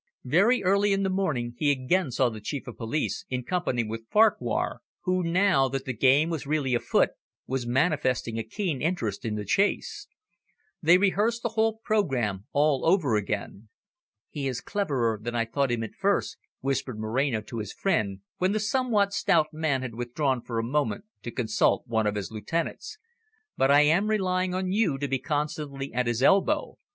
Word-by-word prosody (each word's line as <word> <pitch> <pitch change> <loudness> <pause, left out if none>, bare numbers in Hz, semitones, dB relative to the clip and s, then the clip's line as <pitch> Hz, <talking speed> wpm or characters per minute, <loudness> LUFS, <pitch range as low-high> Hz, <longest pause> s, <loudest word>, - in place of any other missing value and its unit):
Very 195 - +3
early 200 +2 +3
in 195 0 0
the 190 - 0
morning 150 -12 -1
he 150 - +2
again 145 +5 +1
saw 125 0 +2
the 110 -2 -8
Chief 140 +6 -4
of - - -8
Police, 125 +7 -2
in 125 -1 -2
company 150 -6 -1
with 115 +1 -7
Farquhar, 215 0 +2 0.2
who, 185 -1 0
now 175 -5 +3
that 135 0 -4
the 130 - -3
game 135 +7 +3
was 160 -4 -4
really 145 -4 0
afoot, 120 - +2 0.3
was 130 -2 -3
manifesting 130 -4 0
a - - -2
keen 145 - -3
interest 120 - -2
in 110 -2 -2
the 105 -1 -4
chase. 205 - 0 0.7
They 170 +3 +6
rehearsed 210 +4 +1
the 235 - 0
whole 225 0 +1
programme 130 - 0
all 145 -2 +2
over 165 - +3
again. 105 +1 -3 0.6
"He 140 -2 -3
is 125 -2 -2
cleverer 130 - -1
than 120 +2 -4
I 115 0 +1
thought 135 +4 0
him 120 -1 -1
at 110 - -7
first," 200 +1 0 0.2
whispered 135 -4 -2
Moreno 115 +2 0
to 115 +2 -7
his 105 -2 -5
friend, 105 - -1 0.2
when 185 +2 +2
the 215 - +1
somewhat 215 -3 +1
stout 170 -6 +2
man 155 -4 0
had 125 -3 -5
withdrawn 120 +2 -1
for 115 -1 -5
a 115 - 0
moment 130 - -1 0.2
to - - -6
consult 110 -3 +1
one 110 -3 0
of 105 - -1
his 105 0 -4
lieutenants. 165 - -4 0.6
"But 135 - +2
I 145 +1 +7
am 170 +8 +3
relying 185 -3 0
on 185 0 -1
you 195 -9 +1
to 145 +1 -2
be 135 0 -1
constantly 150 -2 -3
at 125 0 0
his 120 +2 0
elbow. 200 - +3
140 Hz, 185 wpm, -27 LUFS, 120-185 Hz, 0.7 s, I